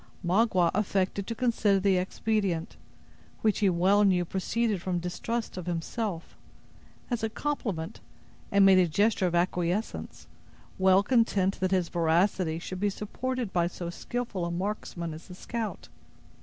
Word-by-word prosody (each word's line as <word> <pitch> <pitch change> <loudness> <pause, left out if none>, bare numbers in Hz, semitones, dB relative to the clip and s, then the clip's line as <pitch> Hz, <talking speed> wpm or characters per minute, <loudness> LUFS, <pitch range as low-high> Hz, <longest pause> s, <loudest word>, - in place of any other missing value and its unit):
Magua 185 -2 +3
affected 195 -1 0
to 230 - -3
consider 225 -5 +2
the 190 -1 +3
expedient, 185 -2 -1 0.7
which 215 -2 +2
he 205 -3 +4
well 190 +4 +4
knew 180 -3 +3
proceeded 205 +3 -1
from 180 0 -1
distrust 185 +6 -3
of 180 -1 -6
himself, 175 +2 -3 0.8
as 240 - 0
a 220 - 0
compliment, 215 - -3 0.5
and 200 0 +6
made 190 -1 +7
a 180 - +4
gesture 200 +3 +2
of 175 - -1
acquiescence, 180 +3 -1 0.5
well 190 +1 +5
content 205 -5 +2
that 185 - +1
his 185 -3 +1
veracity 170 0 +1
should 185 +2 -6
be 205 +1 +2
supported 240 +3 -4
by 170 -1 +2
so 175 -1 -5
skillful 235 -2 -4
a 170 - -1
marksman 170 -2 -3
as 160 +2 -11
the 180 - -10
scout. 225 +2 -5
190 Hz, 145 wpm, -28 LUFS, 175-215 Hz, 0.8 s, made